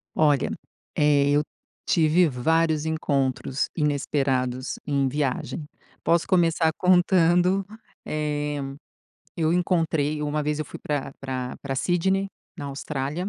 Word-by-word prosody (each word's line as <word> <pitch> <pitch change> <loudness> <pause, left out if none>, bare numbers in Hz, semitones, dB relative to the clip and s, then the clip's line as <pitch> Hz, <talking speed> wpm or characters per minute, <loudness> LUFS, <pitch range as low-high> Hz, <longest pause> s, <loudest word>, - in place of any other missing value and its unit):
Olha, 145 -4 +3 0.5
eh, 145 -1 +4
eu 145 +1 +4 0.5
tive 165 +1 +4
vários 160 +3 +1
encontros 135 -4 -1
inesperados 135 -4 0
em 140 -2 +1
viagem. 145 +3 -2 0.4
Posso 170 0 +2
começar 170 -3 +3
contando, 180 +1 +4 0.4
eh, 150 -1 -2 0.8
eu 160 -1 +1
encontrei 160 -4 +1
uma 150 0 -1
vez 150 0 -1
eu 155 - -2
fui - - -10
pra 145 -2 -3
pra 130 -2 -4
pra 135 -1 -4
Sydney, 190 +6 +1 0.3
na 145 - -6
Austrália. 140 +5 -3
150 Hz, 115 wpm, -25 LUFS, 140-165 Hz, 0.8 s, eh